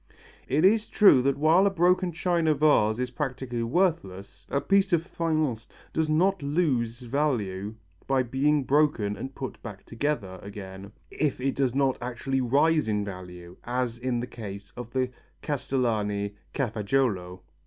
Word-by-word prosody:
It 150 Hz, +6 st, +2 dB
is 215 Hz, +3 st, +3 dB
true 195 Hz, -11 st, +6 dB
that 135 Hz, +1 st, +1 dB
while 165 Hz, +6 st, +4 dB
a -, -, +4 dB
broken 180 Hz, 0 st, +2 dB
china 170 Hz, -2 st, +1 dB
vase 135 Hz, -8 st, +3 dB
is 125 Hz, 0 st, -2 dB
practically 130 Hz, -3 st, -3 dB
worthless, 115 Hz, -, -1 dB
a 140 Hz, -, +1 dB
piece 195 Hz, +5 st, +2 dB
of 165 Hz, -1 st, +3 dB
faience 155 Hz, -10 st, -1 dB, 0.3 s
does 160 Hz, -1 st, 0 dB
not 180 Hz, +4 st, +2 dB
lose 135 Hz, -6 st, 0 dB
value 115 Hz, -7 st, -1 dB, 0.3 s
by 135 Hz, -1 st, +2 dB
being 140 Hz, +4 st, +1 dB
broken 135 Hz, -8 st, +2 dB
and 130 Hz, +5 st, -7 dB
put 130 Hz, -, -6 dB, 0.3 s
together 115 Hz, -7 st, -3 dB
again, 100 Hz, -1 st, -9 dB, 0.2 s
if 150 Hz, -5 st, -1 dB
it 135 Hz, +1 st, 0 dB
does 130 Hz, -2 st, 0 dB
not 135 Hz, -2 st, +1 dB
actually 125 Hz, +2 st, -2 dB
rise 145 Hz, +4 st, +3 dB
in 105 Hz, -1 st, 0 dB
value, 90 Hz, -2 st, -9 dB
as 120 Hz, -1 st, -2 dB
in 125 Hz, -1 st, -1 dB
the -, -, -3 dB
case 100 Hz, -5 st, -9 dB
of 120 Hz, -2 st, -7 dB
the 130 Hz, 0 st, -1 dB, 0.3 s
Castellani 110 Hz, -8 st, -1 dB, 0.2 s
Cafaggiolo. 105 Hz, -6 st, -1 dB
130 Hz, 145 wpm, -27 LUFS, 110-150 Hz, 0.3 s, true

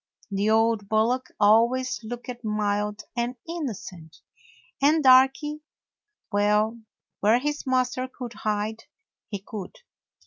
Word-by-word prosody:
The 200 Hz, +2 st, 0 dB
old 220 Hz, -2 st, +2 dB
bullock 230 Hz, +4 st, +1 dB
always 235 Hz, +4 st, +3 dB
looked 245 Hz, +2 st, -7 dB
mild 210 Hz, -1 st, -1 dB
and 240 Hz, +1 st, -1 dB
innocent, 205 Hz, -, -6 dB, 0.6 s
and 300 Hz, +2 st, +4 dB
Darky 270 Hz, +4 st, +5 dB, 0.3 s
— 420 Hz, -, -58 dB
well, 210 Hz, +3 st, +2 dB, 0.4 s
where 215 Hz, +3 st, +4 dB
his 295 Hz, +2 st, -3 dB
master 255 Hz, 0 st, 0 dB
could 250 Hz, -2 st, -8 dB
hide, 215 Hz, +1 st, -3 dB, 0.4 s
he 205 Hz, -, -4 dB
could. 205 Hz, -4 st, -7 dB
230 Hz, 110 wpm, -25 LUFS, 210-255 Hz, 0.6 s, Darky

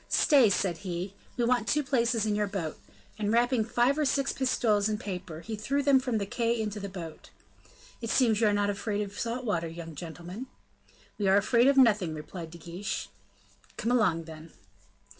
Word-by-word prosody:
"Stay," 270 Hz, -8 st, +5 dB
said 185 Hz, -3 st, 0 dB
he: 180 Hz, 0 st, -4 dB, 0.2 s
"we 240 Hz, -, +1 dB
want 240 Hz, -2 st, +1 dB
two 300 Hz, 0 st, +2 dB
places 235 Hz, -4 st, +1 dB
in 215 Hz, -, +1 dB
your 210 Hz, 0 st, 0 dB
boat;" 185 Hz, -6 st, -4 dB, 0.4 s
and 210 Hz, -1 st, 0 dB
wrapping 240 Hz, 0 st, +3 dB
five 240 Hz, +6 st, +2 dB
or -, -, +3 dB
six 275 Hz, -1 st, +1 dB
pistoles 220 Hz, -5 st, +1 dB
in 215 Hz, -, -1 dB
paper, 180 Hz, -6 st, -6 dB
he 220 Hz, +3 st, -5 dB
threw 275 Hz, +7 st, -1 dB
them 275 Hz, -1 st, +5 dB
from 250 Hz, -3 st, -1 dB
the 200 Hz, -, -1 dB
quay 230 Hz, +3 st, 0 dB
into 210 Hz, -1 st, -3 dB
the 200 Hz, 0 st, -5 dB
boat. 170 Hz, -4 st, -9 dB, 0.7 s
"It 230 Hz, -, -4 dB
seems 230 Hz, -3 st, +3 dB
you 220 Hz, -, +5 dB
are -, -, +4 dB
not 205 Hz, 0 st, +1 dB
afraid 205 Hz, +1 st, -2 dB
of 200 Hz, 0 st, -8 dB
salt 240 Hz, +2 st, -3 dB
water, 170 Hz, -7 st, 0 dB
young 165 Hz, 0 st, -8 dB
gentlemen." 175 Hz, -, -8 dB, 0.7 s
"We 200 Hz, -, +1 dB
are 190 Hz, +1 st, +5 dB
afraid 235 Hz, +5 st, +4 dB
of 280 Hz, 0 st, +4 dB
nothing," 210 Hz, -10 st, +4 dB
replied 160 Hz, +2 st, -7 dB
De 170 Hz, -, -11 dB
Guiche. 170 Hz, +5 st, -5 dB, 0.7 s
"Come 230 Hz, +2 st, -1 dB
along, 190 Hz, -9 st, +2 dB
then." 160 Hz, 0 st, -11 dB
210 Hz, 195 wpm, -29 LUFS, 180-240 Hz, 0.7 s, Stay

